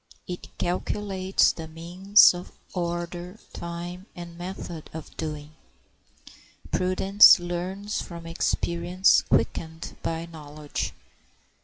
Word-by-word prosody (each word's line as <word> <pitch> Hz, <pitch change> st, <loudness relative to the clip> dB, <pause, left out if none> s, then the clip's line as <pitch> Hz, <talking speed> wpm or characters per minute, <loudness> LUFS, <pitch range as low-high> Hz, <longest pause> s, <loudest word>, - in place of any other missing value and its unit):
It 180 Hz, -1 st, -6 dB
calculates 190 Hz, +1 st, +1 dB
the 160 Hz, -1 st, -8 dB
means, 180 Hz, +7 st, +5 dB, 0.4 s
order, 175 Hz, +1 st, -4 dB, 0.2 s
time, 175 Hz, +3 st, -6 dB
and 170 Hz, -1 st, -9 dB
method 175 Hz, -2 st, -7 dB
of 160 Hz, -, -9 dB
doing. 150 Hz, -1 st, -5 dB, 1.2 s
Prudence 190 Hz, +2 st, +6 dB
learns 180 Hz, +4 st, -3 dB
from 170 Hz, -1 st, -9 dB
experience 170 Hz, +2 st, +2 dB
quickened 160 Hz, 0 st, -1 dB
by 165 Hz, 0 st, -3 dB
knowledge. 150 Hz, -2 st, -6 dB
175 Hz, 90 wpm, -26 LUFS, 165-185 Hz, 1.2 s, Prudence